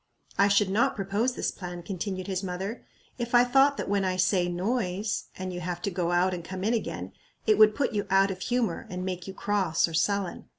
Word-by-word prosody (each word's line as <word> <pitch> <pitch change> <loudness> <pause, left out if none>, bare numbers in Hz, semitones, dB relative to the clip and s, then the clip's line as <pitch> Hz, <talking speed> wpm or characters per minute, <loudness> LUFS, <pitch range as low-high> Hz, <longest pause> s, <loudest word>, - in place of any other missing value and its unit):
"I 200 - +4
should 200 -1 +3
not 215 +4 +2
propose 205 +5 0
this - - -1
plan," 175 -2 -7
continued 185 0 -4
his 190 -2 -2
mother, 190 +4 -4 0.4
"if 240 0 -1
I 240 - +8
thought 270 +3 +4
that - - -3
when 200 0 +1
I 185 -1 0
say 185 -1 +2
Noise, 195 +1 -1
and 185 0 -4
you 175 - -4
have 175 0 -4
to 200 - -1
go 175 -1 -1
out 180 +1 +2
and 175 -1 -5
come 185 +2 -6
in 220 +4 +2
again, 95 - -3 0.3
it 215 -1 +3
would 215 -1 +7
put 275 -4 0
you 205 -1 -1
out 195 +1 +4
of 185 - -6
humor, 235 -5 -1
and 180 0 -4
make 180 -1 -4
you 190 - -7
cross 190 -7 +1
or 165 - -8
sullen. 200 +3 0
195 Hz, 225 wpm, -27 LUFS, 180-210 Hz, 0.4 s, I